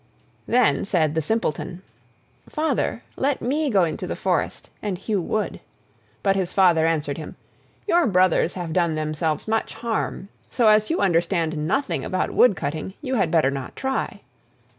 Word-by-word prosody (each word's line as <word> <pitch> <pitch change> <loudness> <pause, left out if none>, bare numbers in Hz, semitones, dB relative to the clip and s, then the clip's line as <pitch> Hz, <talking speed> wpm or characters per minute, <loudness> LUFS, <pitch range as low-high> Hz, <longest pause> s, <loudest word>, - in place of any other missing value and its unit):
Then 250 -1 +3
said 160 -7 +1
the 160 - +1
Simpleton: 180 -1 -2 0.7
"Father, 300 -6 -1
let 275 0 +1
me 290 +5 0
go 195 -6 +4
into 160 -2 -2
the - - -3
forest - - -2
and 200 -4 -2
hew 200 +1 -1
wood." 210 +5 -2 0.6
But 195 -1 +3
his 185 -2 -1
Father 170 -4 +4
answered 150 -3 -1
him: 155 - -8 0.5
"Your 345 -3 +4
brothers 185 -3 +3
have 175 -3 -4
done 170 -3 +1
themselves 155 +2 -2
much 220 0 -1
harm, 225 -4 -3 0.2
so 235 -4 +3
as 215 0 +4
you 330 - 0
understand 170 -3 +1
nothing 275 - 0
about 185 - -1
wood 245 -6 +5
cutting 155 +5 -4
you 260 -2 -2
had 195 -9 +2
better 155 -5 +3
not 135 -2 -6
try." 265 0 -2
185 Hz, 160 wpm, -23 LUFS, 160-225 Hz, 0.7 s, wood